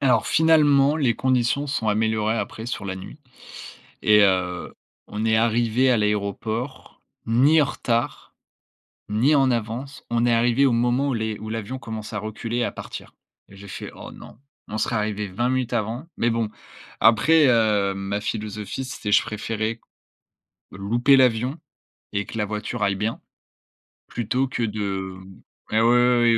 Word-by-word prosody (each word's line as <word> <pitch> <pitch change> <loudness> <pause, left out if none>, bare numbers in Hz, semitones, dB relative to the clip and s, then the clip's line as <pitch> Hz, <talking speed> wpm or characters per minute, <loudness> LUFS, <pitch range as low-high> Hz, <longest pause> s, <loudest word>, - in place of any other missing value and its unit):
Alors 135 -3 +3
finalement, 150 -3 +4
les 130 -7 +2
conditions 130 +2 +1
sont 135 -6 -2
améliorées 110 +1 +1
après 110 0 -5
sur 115 -4 -4
la 95 -1 -4
nuit 95 +10 -10 0.8
et 105 0 +6
heu, 90 -2 0 0.3
on 105 +1 -4
est 110 - +3
arrivés 115 +3 +2
à 125 - +4
l'aéroport 105 +5 -3 0.2
ni 140 +8 +4
en - - +1
retard 120 -3 -2 0.8
ni 120 +9 +3
en 135 -2 +4
avance. 120 +4 -4
On 120 0 +1
est 120 - +3
arrivés 120 +4 +3
au 130 - +3
moment 120 +4 +1
où - - -1
les 110 -2 -2
où 110 - -7
l'avion 115 +4 -4
commençait 110 -2 -7
à - - -2
reculer 110 +2 -4
et 120 - +1
à - - -1
partir - - -9 0.3
et 100 - -15
j'ai 100 +1 -12
fait: 95 - -7
«Oh - - -10
non». - - -13 0.3
On 110 - -4
serait 115 - -1
arrivé 105 -1 -2
20 120 +7 -1
minutes 130 -2 -1
avant 115 +6 -2
mais 120 - +2
bon, 115 -1 0 0.5
après, 145 +8 +5
heu, 105 -5 +2
ma 100 +1 -3
philosophie, 105 +2 -4
c'était 120 -5 -5
je - - +6
préférais 110 +1 -3
q - - -33 0.9
louper 120 +8 +3
l'avion 125 +2 +2 0.6
et 100 -1 -1
que - - -8
la 105 - +1
voiture 105 +2 -4
aille 100 -1 +1
bien 105 +4 -3 0.9
plutôt 125 +3 -1
que 120 -2 -2
de 100 -3 -3 0.6
ouais, 110 - +3
ouais, 115 - +4
ouais, 120 0 +4
115 Hz, 165 wpm, -23 LUFS, 105-125 Hz, 0.9 s, et